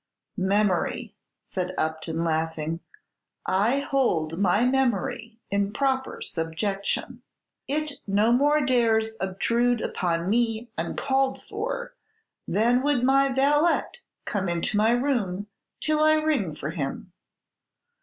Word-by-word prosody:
"Memory!" 195 Hz, -1 st, 0 dB, 0.4 s
said 185 Hz, -1 st, -3 dB
Upton, 160 Hz, +1 st, -2 dB
laughing, 160 Hz, 0 st, -1 dB, 0.7 s
"I 210 Hz, +8 st, +2 dB
hold 175 Hz, -, 0 dB
my 200 Hz, +4 st, +3 dB
memory 235 Hz, -3 st, 0 dB
in 200 Hz, 0 st, +1 dB
proper 265 Hz, +2 st, -1 dB
subjection. 180 Hz, +5 st, -3 dB, 0.5 s
It 300 Hz, +1 st, -2 dB
no 205 Hz, +3 st, +3 dB
more 290 Hz, +5 st, +4 dB
dares 225 Hz, -3 st, +2 dB
obtrude 235 Hz, +6 st, +1 dB
upon 170 Hz, -4 st, -1 dB
me 225 Hz, +1 st, 0 dB
uncalled 270 Hz, -1 st, -1 dB
for 485 Hz, +4 st, -4 dB, 0.5 s
than 235 Hz, +6 st, +3 dB
would 280 Hz, -3 st, +1 dB
my 275 Hz, +1 st, +4 dB
valet 295 Hz, +5 st, +3 dB, 0.4 s
come 195 Hz, -3 st, -1 dB
into 170 Hz, +4 st, -1 dB
my 215 Hz, +2 st, +4 dB
room 235 Hz, -7 st, 0 dB, 0.3 s
till 310 Hz, 0 st, 0 dB
I 310 Hz, 0 st, +5 dB
ring 295 Hz, -, 0 dB
for 155 Hz, 0 st, -4 dB
him. 165 Hz, +3 st, -5 dB
220 Hz, 110 wpm, -26 LUFS, 185-270 Hz, 0.7 s, I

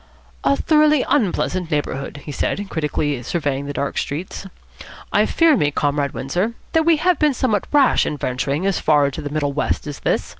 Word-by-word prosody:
"A 280 Hz, -, +3 dB
thoroughly 305 Hz, -2 st, +3 dB
unpleasant 185 Hz, -, 0 dB
neighbourhood," 145 Hz, -2 st, -3 dB
he 150 Hz, -, -5 dB
said, 200 Hz, +7 st, -2 dB
critically 150 Hz, -4 st, -1 dB
surveying 140 Hz, 0 st, -2 dB
the -, -, -3 dB
dark 140 Hz, 0 st, -2 dB
streets. 175 Hz, +6 st, -5 dB, 0.7 s
"I -, -, +3 dB
fear 330 Hz, -2 st, +4 dB
me, 150 Hz, -, +2 dB
Comrade 145 Hz, -1 st, -1 dB
Windsor, 180 Hz, -, -1 dB, 0.2 s
that 320 Hz, 0 st, +2 dB
we 330 Hz, -2 st, +5 dB
have 355 Hz, +3 st, +2 dB
been 300 Hz, -3 st, +2 dB
somewhat 215 Hz, -7 st, 0 dB
rash 285 Hz, -3 st, +4 dB
in 150 Hz, -, -3 dB
venturing 140 Hz, +6 st, -2 dB
as 195 Hz, -3 st, +1 dB
far 150 Hz, -2 st, +3 dB
into 140 Hz, -, -3 dB
the 145 Hz, -, -5 dB
middle 145 Hz, -1 st, -1 dB
west 150 Hz, -, -1 dB
as 145 Hz, -2 st, -6 dB
this. -, -, 0 dB
155 Hz, 185 wpm, -20 LUFS, -, 0.7 s, we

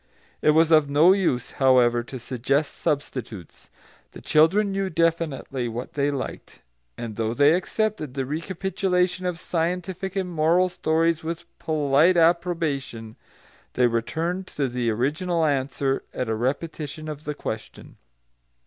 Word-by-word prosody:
It 150 Hz, -, +4 dB
was 165 Hz, 0 st, +4 dB
of 155 Hz, -3 st, +5 dB
no 155 Hz, +6 st, +6 dB
use, 170 Hz, -11 st, 0 dB
however, 125 Hz, -2 st, +4 dB
to 130 Hz, +2 st, -8 dB
suggest 135 Hz, +4 st, -1 dB
substitutes. 125 Hz, -, -4 dB, 0.4 s
The -, -, -11 dB
children 195 Hz, +7 st, +3 dB
knew 195 Hz, 0 st, -1 dB
definitely 160 Hz, -6 st, -1 dB
what 120 Hz, +2 st, -6 dB
they 145 Hz, 0 st, +1 dB
liked, 140 Hz, -2 st, -6 dB, 0.3 s
and 115 Hz, -3 st, -6 dB
though 115 Hz, 0 st, -1 dB
they 145 Hz, +3 st, +5 dB
accepted 185 Hz, -, -2 dB
the 135 Hz, -1 st, -1 dB
recapitulation 180 Hz, +3 st, -1 dB
of 180 Hz, -2 st, -2 dB
scientific 180 Hz, +3 st, -3 dB
and 190 Hz, -2 st, -1 dB
moral 170 Hz, +2 st, +2 dB
stories 165 Hz, -1 st, 0 dB
with 165 Hz, +1 st, -5 dB
polite 155 Hz, +2 st, +3 dB
approbation, 165 Hz, -9 st, 0 dB, 0.6 s
they 125 Hz, -, +3 dB
returned 160 Hz, +11 st, -1 dB
to 140 Hz, -2 st, -2 dB
the 120 Hz, -1 st, -1 dB
original 155 Hz, +9 st, 0 dB
answer 135 Hz, -1 st, 0 dB
at 125 Hz, -, -2 dB
a -, -, +1 dB
repetition 150 Hz, +5 st, -3 dB
of 150 Hz, 0 st, -7 dB
the 150 Hz, -, -3 dB
question. 110 Hz, -5 st, -7 dB
155 Hz, 135 wpm, -24 LUFS, 130-170 Hz, 0.6 s, no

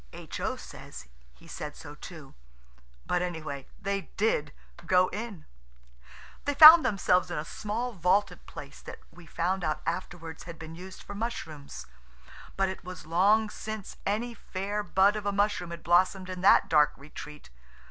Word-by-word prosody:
H.O. -, -, -4 dB
says 60 Hz, 0 st, -11 dB, 0.3 s
he -, -, -19 dB
said 150 Hz, -1 st, -7 dB
so 145 Hz, -2 st, -10 dB
too. 150 Hz, -2 st, -11 dB, 0.7 s
But 180 Hz, -, 0 dB
any 175 Hz, -2 st, -3 dB
way, 140 Hz, -3 st, -6 dB
they 195 Hz, 0 st, -3 dB
did 150 Hz, -9 st, +1 dB, 0.3 s
go 180 Hz, +1 st, +3 dB
in. 210 Hz, -6 st, -6 dB, 1.0 s
They 285 Hz, -, 0 dB
found 315 Hz, +3 st, +11 dB
themselves 195 Hz, -6 st, +2 dB
in -, -, -3 dB
a 150 Hz, -, -3 dB
small 230 Hz, +7 st, -4 dB
vaulted 190 Hz, +2 st, +1 dB
place -, -, -10 dB
that -, -, -9 dB
we 175 Hz, -2 st, -15 dB
found 180 Hz, +4 st, -1 dB
out 155 Hz, -, -2 dB
afterwards 165 Hz, -1 st, -5 dB
had 170 Hz, -1 st, -9 dB
been 160 Hz, 0 st, -9 dB
used 185 Hz, +3 st, -10 dB
for -, -, -8 dB
mushrooms. 160 Hz, -10 st, -6 dB, 0.7 s
But 195 Hz, 0 st, +2 dB
it 190 Hz, 0 st, -6 dB
was 180 Hz, -3 st, -9 dB
long 200 Hz, +7 st, +3 dB
since 215 Hz, -2 st, -7 dB
any 230 Hz, +4 st, -1 dB
fair 205 Hz, 0 st, -4 dB
bud 200 Hz, 0 st, +3 dB
of 210 Hz, -1 st, -4 dB
a -, -, +2 dB
mushroom 200 Hz, -3 st, 0 dB
had 170 Hz, 0 st, -8 dB
blossomed 185 Hz, +2 st, +2 dB
in 180 Hz, -1 st, -6 dB
that 190 Hz, -, +6 dB
dark 150 Hz, -2 st, +4 dB
retreat. 150 Hz, -, -11 dB
185 Hz, 160 wpm, -28 LUFS, 160-205 Hz, 1.0 s, found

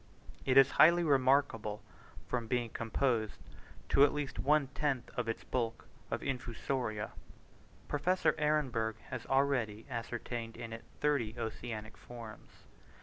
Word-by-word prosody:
It 130 Hz, 0 st, +4 dB
is 135 Hz, -1 st, +8 dB
highly 170 Hz, +2 st, +7 dB
remarkable, 130 Hz, -7 st, +2 dB, 0.4 s
from 120 Hz, -2 st, -2 dB
being 120 Hz, -1 st, 0 dB
composed, 115 Hz, -1 st, 0 dB, 0.5 s
to 140 Hz, -, +6 dB
at 145 Hz, -, +6 dB
least 145 Hz, -2 st, -3 dB
one 145 Hz, -1 st, +3 dB
tenth 140 Hz, -3 st, -1 dB
of 120 Hz, -2 st, -1 dB
its 115 Hz, -, -3 dB
bulk, 115 Hz, -3 st, -2 dB, 0.2 s
of -, -, -2 dB
Infusoria. 120 Hz, -4 st, -2 dB, 0.8 s
Professor 175 Hz, +6 st, +2 dB
Ehrenberg 130 Hz, -8 st, +1 dB, 0.2 s
has 125 Hz, -2 st, -5 dB
already 130 Hz, -6 st, +1 dB
ascertained 115 Hz, 0 st, -4 dB
in 115 Hz, -1 st, -6 dB
it 115 Hz, -, -8 dB, 0.2 s
thirty 140 Hz, -7 st, +1 dB
oceanic 110 Hz, -1 st, -5 dB
forms. 115 Hz, -3 st, -10 dB
120 Hz, 125 wpm, -33 LUFS, 115-140 Hz, 0.8 s, is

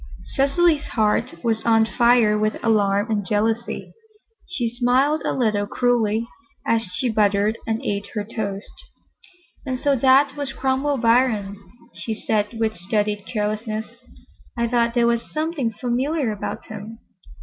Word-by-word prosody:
Cecily's 295 Hz, +3 st, +2 dB
heart 210 Hz, -5 st, +1 dB
was 225 Hz, -2 st, 0 dB
on 225 Hz, -1 st, +4 dB
fire 235 Hz, -2 st, +4 dB
with 215 Hz, 0 st, 0 dB
alarm 205 Hz, -1 st, +2 dB
and 205 Hz, -2 st, 0 dB
jealousy. 220 Hz, +4 st, -1 dB, 0.5 s
She 260 Hz, -10 st, -1 dB
smiled 255 Hz, +6 st, +2 dB
a -, -, 0 dB
little 215 Hz, -5 st, 0 dB
cruelly 230 Hz, -2 st, +1 dB, 0.4 s
as 230 Hz, 0 st, +2 dB
she 215 Hz, +8 st, 0 dB
buttered 210 Hz, -1 st, +2 dB
and 225 Hz, 0 st, -2 dB
ate 200 Hz, 0 st, -2 dB
her 210 Hz, -, -1 dB
toast. 205 Hz, -2 st, -5 dB, 0.9 s
"And 260 Hz, -2 st, -3 dB
so 280 Hz, +2 st, +2 dB
that 270 Hz, +2 st, +4 dB
was 285 Hz, -2 st, -4 dB
Cromwell 270 Hz, +2 st, 0 dB
Biron," 230 Hz, -4 st, +2 dB, 0.4 s
she 220 Hz, -, -4 dB
said 215 Hz, +1 st, -1 dB
with 220 Hz, -1 st, 0 dB
studied 205 Hz, +3 st, -1 dB
carelessness. 215 Hz, 0 st, -2 dB, 0.7 s
"I 235 Hz, 0 st, +1 dB
thought 235 Hz, 0 st, +1 dB
there 240 Hz, -1 st, +4 dB
was 235 Hz, 0 st, 0 dB
something 310 Hz, -6 st, -1 dB
familiar 255 Hz, +4 st, -1 dB
about 210 Hz, -, -5 dB
him. 225 Hz, +3 st, -8 dB
230 Hz, 140 wpm, -22 LUFS, 210-255 Hz, 0.9 s, on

